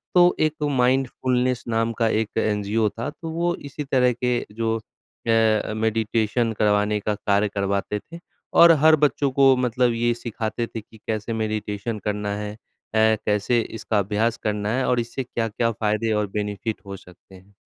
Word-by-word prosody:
तो 175 0 +6
एक 155 0 -6
माइंडफुलनेस 125 -1 +1
नाम 115 0 0
का 115 - +3
एक 110 -1 0
एनजीओ 105 0 +1
था 115 +7 -5
तो 165 +2 -8
वो 170 +1 0
इसी 140 +1 -7
तरह 130 -2 +2
के 125 -1 +2
जो 115 +1 -1
अ, 110 -1 -1
मेडिटेशन 110 +1 0
करवाने 105 0 +2
का 105 +1 -1
कार्य 100 0 +1
करवाते 100 +1 -1
थे, 165 +11 -12 0.3
और 170 0 +8
हर 160 0 +8
बच्चों 140 -2 +1
को 135 0 +5
मतलब 125 -1 +1
ये 120 +1 +1
सिखाते 115 0 -4
थे 115 - -7
कि 110 - -18
कैसे 110 +1 -2
मेडिटेशन 110 0 -3
करना 105 -1 -2
है? 105 0 -5
अ, - - -15 0.7
कैसे 105 +3 +2
इसका 110 -1 -2
अभ्यास 105 +4 0
करना 105 -1 -1
है? 130 - 0
और 125 -1 +2
इससे 120 +3 -3
क्या-क्या 115 -1 -1
फायदे 110 +1 -1
और 105 -1 0
बेनिफिट 105 0 -3
हो 100 0 -7
सकते 90 +1 -17
हैं। 95 +2 -18
115 Hz, 165 wpm, -23 LUFS, 105-125 Hz, 0.7 s, और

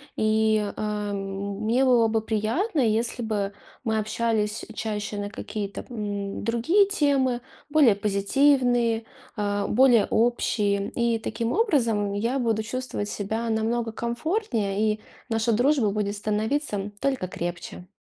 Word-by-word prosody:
И, 215 -1 +2
э, 210 -1 -2
мне 200 +5 -1
было 240 -3 +5
бы 220 0 +1
приятно, 225 - -1
если 230 0 +1
бы 205 -3 -2 0.3
мы 220 -2 0
общались 215 0 -1
чаще 210 -1 -3
на 205 0 -3
какие-то, 205 -1 -5
м, 205 -4 -4
другие 280 - +3
темы, 275 -9 +1 0.3
более 290 -8 +5
позитивные, 235 +3 +2 0.3
э, 205 -1 0
более 245 -2 +5
общие. 210 -4 +1
И 235 -1 0
таким 225 +1 -2
образом, 235 - +1
я 230 +6 0
буду 225 -3 0
чувствовать 240 -3 -4
себя 220 +4 -3
намного 225 +1 0
комфортнее, 235 - -1
и 210 - -8 0.3
наша 225 +1 +1
дружба 245 0 +3
будет 205 0 -1
становиться 210 0 -1
только 265 -9 0
крепче. 175 0 -6
220 Hz, 125 wpm, -25 LUFS, 205-245 Hz, 0.3 s, было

